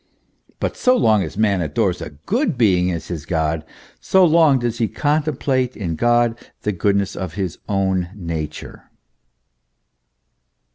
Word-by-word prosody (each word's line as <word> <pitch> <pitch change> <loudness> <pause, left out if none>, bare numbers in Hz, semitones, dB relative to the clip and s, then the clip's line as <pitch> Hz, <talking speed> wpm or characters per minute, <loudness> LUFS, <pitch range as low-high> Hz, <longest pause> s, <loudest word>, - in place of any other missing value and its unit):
But - - -2
so 255 0 +3
long 110 - +3
as 95 - -5
man 100 -4 +2
adores 90 +4 0
a - - -5
good 195 - -2
being 90 -6 +3
as 85 -2 -4
his 85 -5 -4
God, 80 -1 -1 0.4
so 190 -1 +4
long 160 -4 +5
does 120 -1 -2
he 115 - +2
con 150 +6 +1
template 130 -4 -1
in 85 -6 -3
God 120 +2 +2 0.2
the 105 - 0
goodness 100 +1 0
of 95 -4 -5
his 95 -5 -3
own 95 -3 0
nature. 80 -5 -6
100 Hz, 145 wpm, -20 LUFS, 90-125 Hz, 0.4 s, long